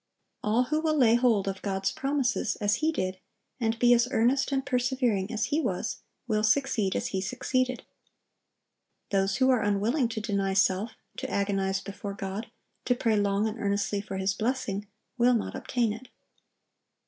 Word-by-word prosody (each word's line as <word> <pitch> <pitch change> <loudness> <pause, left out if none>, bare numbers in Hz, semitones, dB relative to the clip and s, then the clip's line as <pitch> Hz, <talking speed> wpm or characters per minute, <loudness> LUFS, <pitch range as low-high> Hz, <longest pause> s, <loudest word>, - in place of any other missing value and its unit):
All 220 +4 +3
who 305 +4 0
will 315 -1 +1
lay 235 -5 +5
hold 235 -5 +3
of 195 -1 -3
God's 195 -1 -1
promises, 265 -5 0
as 205 0 +1
he 315 +1 +1
did, 185 -10 -3 0.4
and 225 -1 0
be 245 +1 +5
as 240 0 +3
earnest 260 +4 +2
and 270 -1 0
persevering 250 -6 0
as 220 -2 0
he 310 - +3
was, - - -2 0.3
will 215 -2 +1
succeed 220 -3 +1
as - - -1
he 190 - -2
succeeded. 255 +3 -1 1.3
Those 195 0 +2
who 260 0 +4
are 250 -3 +3
unwilling 210 +6 +1
to 225 -1 -4
deny 200 -2 -1
self, 195 +3 +2 0.2
to - - -4
agonize 195 -1 0
before 200 0 -6
God, 195 +3 -5 0.4
to 245 - +2
pray 225 -2 +1
long 205 +1 +1
and 220 +1 -5
earnestly 200 0 0
for 200 -1 -6
His 190 +1 0
blessing, 220 -3 -2 0.3
will 245 +1 +5
not 225 - -2
obtain 235 -4 -1
it. 240 +4 -10
220 Hz, 170 wpm, -28 LUFS, 200-250 Hz, 1.3 s, lay